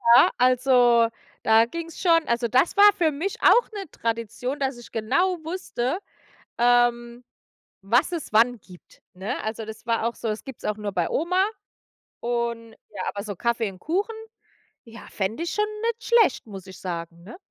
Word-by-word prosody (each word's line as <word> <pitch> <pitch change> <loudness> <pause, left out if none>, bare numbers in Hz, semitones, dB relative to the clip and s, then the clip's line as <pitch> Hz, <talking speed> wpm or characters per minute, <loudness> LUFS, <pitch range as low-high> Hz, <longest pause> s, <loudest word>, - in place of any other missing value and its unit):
ja, 250 - +7
also, 245 -2 +4 0.3
da 225 +1 +5
ging's 330 +5 -7
schon 330 -3 +4
also, 235 0 0
das 255 +8 +2
war 410 0 +9
für 345 -6 +1
mich 330 +8 -3
auch 485 - +5
'ne 390 -6 -6
Tradition, 230 +4 -3
dass 265 -2 -1
ich 240 - -13
genau 350 +12 +1
wusste, 325 -3 -3 0.6
ähm, 240 0 +2 0.6
was 240 - +2
es 330 -9 -5
wann 235 +3 +4
gibt, 180 -2 -18
ne? 190 +3 -4
Also, 220 +1 -4
das 220 0 -10
war 230 -1 0
auch 235 - -2
so 225 - -5
das 215 0 -4
gibt's 265 -3 -10
auch 210 - -1
nur 210 -2 -5
bei 175 -3 0
Oma 365 +4 +1 0.8
und 235 -1 -2 0.2
ja, 200 -3 -7
aber 200 0 -5
so 205 -3 -6
Kaffee 235 -1 -1
und 185 - -15
Kuchen, 395 - -2 0.7
ja, 230 -1 -12
fände 215 +10 -3
ich 340 - -3
schon 420 0 +1 0.2
nicht 460 0 -2
schlecht, 455 - +4
muss 195 -3 -10
ich 185 - -11
sagen, 170 -2 -6
ne? 200 - -11
240 Hz, 175 wpm, -24 LUFS, 220-320 Hz, 0.8 s, war